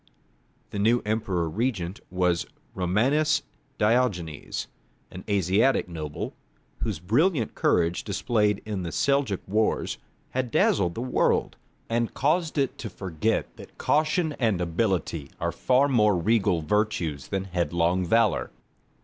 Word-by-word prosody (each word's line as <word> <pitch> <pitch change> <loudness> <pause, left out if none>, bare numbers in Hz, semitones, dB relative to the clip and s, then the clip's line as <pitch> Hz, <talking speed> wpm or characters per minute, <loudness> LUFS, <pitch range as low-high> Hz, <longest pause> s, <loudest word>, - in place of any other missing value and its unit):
The 100 - -4
new 115 +4 +3
Emperor 105 -6 0
regent 100 -1 -2
was 90 -1 +1 0.3
Romanus 135 - +2 0.3
Diogenes, 105 - 0 0.5
an 90 - -8
Asiatic 100 +6 +2
noble, 80 -4 -5 0.5
whose 110 -6 -2
brilliant 120 - +1
courage 85 0 +1
displayed 105 -3 0
in 105 -3 -3
the 85 -2 -4
Seljouk 140 -8 +1
wars 110 +3 0 0.3
had 130 -1 -1
dazzled 90 -5 +2
the 115 - -3
world, 130 - +1 0.3
and 115 0 -1
caused 155 +3 +1
it 135 -3 0
to 115 - -5
forget 95 +3 -2
that - - -13
caution 155 +1 +1
and 110 -7 +2
ability 85 -4 -1
are 85 0 -1
far 130 - +3
more 105 -7 +3
regal 95 -2 +2
virtues 90 -7 -1
than 95 -1 -2
headlong 90 -1 0
valour. 110 +4 +2
105 Hz, 125 wpm, -26 LUFS, 90-120 Hz, 0.5 s, new